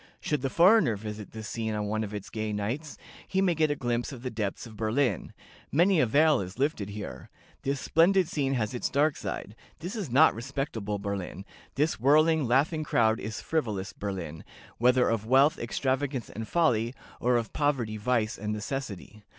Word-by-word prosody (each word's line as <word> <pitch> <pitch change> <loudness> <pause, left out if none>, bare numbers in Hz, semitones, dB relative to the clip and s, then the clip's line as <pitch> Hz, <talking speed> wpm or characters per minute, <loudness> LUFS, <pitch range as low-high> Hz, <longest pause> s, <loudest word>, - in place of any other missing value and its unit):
Should 150 -3 -1
the 135 - -1
foreigner 175 - +5
visit 105 0 -7
this 110 -1 -7
scene 110 0 -3
on 105 0 -2
one 110 +1 -1
of 105 - -5
its 105 -2 -7
gay 110 -1 -3
nights, 120 +9 -3 0.3
he 190 - 0
may 190 -2 +3
get 155 -1 +2
a 145 - 0
glimpse 120 -1 -2
of 125 -3 -9
the 125 - -3
depths 105 -3 -3
of 110 -2 -11
Berlin 110 - 0
life. - - -14 0.4
Many 175 +4 +4
a 130 - +4
veil 150 +3 +4
is 95 +1 -7
lifted 135 -7 -1
here. 105 0 -7 0.3
This 140 0 -1
splendid 180 +4 +3
scene 140 -5 -1
has 115 -1 -1
its 125 - -2
dark 145 +1 +2
side. 105 +1 -5 0.2
This 180 +7 -6
is 200 - -4
not 145 +7 +6
respectable 115 -4 -3
Berlin. 100 -1 -5 0.3
This 150 0 +1
whirling, 155 +3 +4
laughing 150 +6 +2
crowd 115 -6 +2
is 110 +1 -5
frivolous 110 -12 -2
Berlin, 90 -6 -5 0.4
whether 125 +1 +4
of 110 -1 -1
wealth, 135 +5 +4
extravagance, 130 +1 -2
and 110 +1 -6
folly, 125 -8 +1 0.2
or 125 +1 +2
of 115 -1 -3
poverty, 130 -7 0
vice, 110 0 0
and 105 +1 -3
necessity. 105 -2 -5
120 Hz, 185 wpm, -28 LUFS, 105-145 Hz, 0.4 s, not